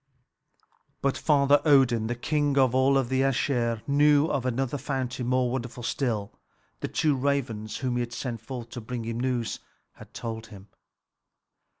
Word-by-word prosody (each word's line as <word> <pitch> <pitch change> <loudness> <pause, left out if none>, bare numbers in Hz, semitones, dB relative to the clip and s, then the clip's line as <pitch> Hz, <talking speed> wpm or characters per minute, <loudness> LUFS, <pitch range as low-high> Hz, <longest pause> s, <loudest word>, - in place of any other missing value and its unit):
But 140 -1 +2
Father 145 -1 +3
Odin, 130 -7 +4
the 120 - -2
king 145 +2 0
of 130 -3 +4
all 130 +1 +4
the 130 +2 0
Æsir, 120 -4 0
knew 145 +1 +4
of 130 -2 -1
another 135 +3 -1
fountain 130 -2 -3
more 125 -1 +1
wonderful 125 -1 -4
still; 115 -5 -2 0.5
the - - -3
two 150 -1 +1
ravens 125 -6 -1
whom 125 -2 -1
he 120 -1 -1
sent 120 -2 -5
forth 120 -1 -7
to 120 - -6
bring 120 +1 -5
him 115 +1 -4
news 125 -2 -1 0.4
had - - -13
told 115 -1 -5
him. 100 -2 -13
125 Hz, 155 wpm, -27 LUFS, 115-140 Hz, 0.5 s, Odin